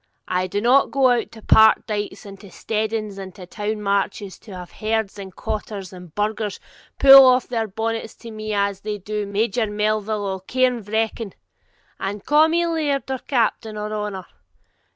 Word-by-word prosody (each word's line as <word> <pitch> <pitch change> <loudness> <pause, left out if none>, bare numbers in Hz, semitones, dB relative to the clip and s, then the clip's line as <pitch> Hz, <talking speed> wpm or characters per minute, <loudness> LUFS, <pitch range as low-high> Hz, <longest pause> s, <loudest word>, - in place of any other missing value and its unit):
I 185 0 0
do 205 +3 -2
not 255 +4 +4
go 270 -2 +3
out 240 -2 0
to 220 -2 -13
park 220 0 +5
dikes 205 -2 -4
and 195 -1 -10
to 200 - -13
steadings 215 -1 -3
and 190 -2 -8
to 200 - -13 0.3
market 200 -1 0
towns 195 -4 -9
to 210 - -14
have 180 -1 -9
herds 215 -2 -2
and 190 -2 -9
cottars 210 -3 -5
and 180 -2 -11
burghers 210 0 -2 0.4
pull 270 0 +10
off 255 -1 +4
their 225 -3 -2
bonnets 225 +2 -4
to 230 - -11
me 215 0 -6
as 200 -1 0
they 210 0 -4
do 210 +1 -4
to - - -9
Major 220 +2 0
Melville 210 0 -1
o' 190 -1 -3
Cairnvreckan, 225 -2 -1 0.7
and 200 +1 -4
ca' 300 +2 +5
me 340 +1 +1
laird 295 -5 -1
or 260 - -2
captain 225 -4 -1
or 210 0 -4
honour. 210 -3 -4
215 Hz, 175 wpm, -22 LUFS, 200-230 Hz, 0.7 s, pull